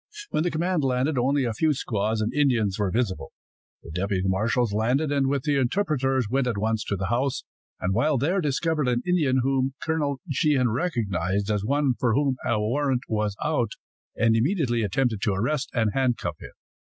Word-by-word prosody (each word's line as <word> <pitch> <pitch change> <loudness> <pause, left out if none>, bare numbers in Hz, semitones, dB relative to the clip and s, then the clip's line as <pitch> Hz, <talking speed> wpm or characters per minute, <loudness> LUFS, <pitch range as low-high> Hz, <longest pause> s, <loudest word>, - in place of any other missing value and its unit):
When - - +1
the 175 - +1
command 170 0 0
landed, 130 +2 +1
only 135 +3 +2
a 120 -2 -1
few 155 +7 +2
squaws 110 -4 -1
and 110 - -1
Indians 120 -9 +1
were 100 -2 +1
visible. 95 - -2 0.5
The 80 - -10
deputy 95 +2 -1
marshals 110 +4 +1
landed, 125 +8 +1
and 140 -2 +2
with 140 -1 0
the 145 -1 +1
interpreters 135 - +1
went 130 +3 0
at 115 -4 -1
once 110 +1 0
to 100 - -1
the 95 -1 -3
house, 125 +4 0 0.4
and 95 +1 -1
while 145 +7 +2
there 170 +10 +1
discovered 150 0 0
an 120 0 0
Indian 150 -8 +2
whom 135 0 0
Colonel 150 -4 -1
Sheehan 135 -4 +2
recognized 100 - -1
as 105 -1 0
one 140 +3 +1
for 120 -3 +2
whom 140 -2 +1
a 115 -2 +1
warrant 130 +4 0
was 105 -2 -1
out, - - 0 0.4
and 115 0 +3
immediately 125 - +1
attempted 110 +1 0
to 105 - +1
arrest 130 +8 -1
and 110 -3 +1
handcuff 130 -3 0
him. - - -9
125 Hz, 185 wpm, -25 LUFS, 110-140 Hz, 0.5 s, and